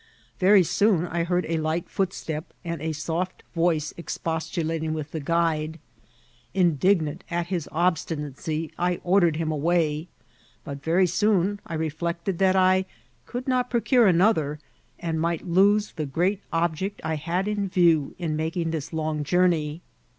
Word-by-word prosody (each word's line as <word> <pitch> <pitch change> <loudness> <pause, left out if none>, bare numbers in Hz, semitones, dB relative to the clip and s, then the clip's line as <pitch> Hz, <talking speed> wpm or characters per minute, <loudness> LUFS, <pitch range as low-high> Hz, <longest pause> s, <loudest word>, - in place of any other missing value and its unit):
Very 190 +1 +6
soon 190 -1 +2
I 170 -1 -1
heard 180 +1 0
a 165 0 0
light 160 +2 -1
footstep, 170 -4 -3
and 170 -3 -4
a 160 0 -1
soft 165 +4 -3
voice 165 -3 +1
expostulating 160 -1 -2
with 155 -1 -5
the 160 - -3
guide. 160 0 0 0.8
Indignant 175 -2 +2
at 170 0 -1
his 170 -5 -2
obstinacy, 155 -2 -1
I 175 0 +1
ordered 175 -3 +3
him 160 0 -1
away; 155 0 +1 0.6
but 140 -3 -7
very 170 +5 +3
soon 200 +2 +1
I 165 - -4
reflected 170 +3 -2
that 190 -1 +4
I 185 0 +4 0.4
could 250 +1 -5
not 250 -1 +1
procure 240 -1 +3
another, 170 -5 +3 0.4
and 165 -2 -2
might 170 +1 -1
lose 200 +4 +3
the 155 -4 -4
great 180 +8 0
object 170 +4 -1
I 160 - -1
had 175 +6 -1
in 205 -2 -1
view 170 -6 +3
in 165 -4 -2
making 165 +1 -1
this 155 -3 -4
long 155 -2 -2
journey. 165 -1 +1
170 Hz, 145 wpm, -25 LUFS, 155-185 Hz, 0.8 s, Very